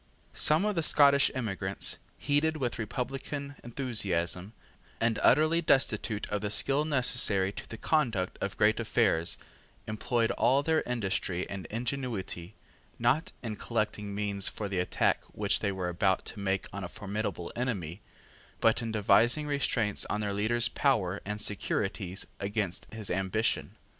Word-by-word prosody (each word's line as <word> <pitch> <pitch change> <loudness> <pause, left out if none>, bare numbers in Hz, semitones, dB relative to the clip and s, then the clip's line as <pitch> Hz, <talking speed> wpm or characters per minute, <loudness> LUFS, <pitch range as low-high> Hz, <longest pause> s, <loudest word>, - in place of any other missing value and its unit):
Some 155 +6 +3
of 210 - +1
the 170 - 0
Scottish 140 -2 +5
emigrants, 100 -5 -1 0.2
heated 155 +2 +1
with 125 -4 -2
republican 135 +5 -4
enthusiasm, 105 -7 -2 0.5
and 115 -1 +1
utterly 155 +5 +4
destitute 110 -8 +1
of 105 -1 -1
the 105 - -2
skill 135 +7 +4
necessary 120 -9 +2
to - - -9
the 115 - -7
conduct 115 - 0
of - - -3
great - - +3
affairs, 85 +1 +1 0.5
employed 115 +2 0
all 135 +3 +3
their 160 +1 +2
industry 95 -6 -1
and 100 -2 -6
ingenuity, 115 -7 -4 0.4
not 120 +7 +1
in 110 -3 -4
collecting 105 -3 -2
means 100 -1 +1
for 105 - -2
the 95 -2 -2
attack 90 - +1
which 105 -1 +1
they 100 - 0
were 95 -2 -3
about 95 +2 +1
to 105 - -7
make 95 -1 -1
on 100 0 -5
a - - -3
formidable 100 -3 -4
enemy, 100 -8 -3 0.6
but 115 +1 +3
in 115 -1 -3
devising 110 +7 +3
restraints 125 -7 0
on 105 - -2
their 105 -1 -1
leader's 115 +4 +3
power 100 -9 +1
and 105 +1 -4
securities 95 -2 -2
against 100 -2 -3
his 110 -2 -3
ambition. 95 +4 -1
110 Hz, 145 wpm, -30 LUFS, 100-125 Hz, 0.6 s, Scottish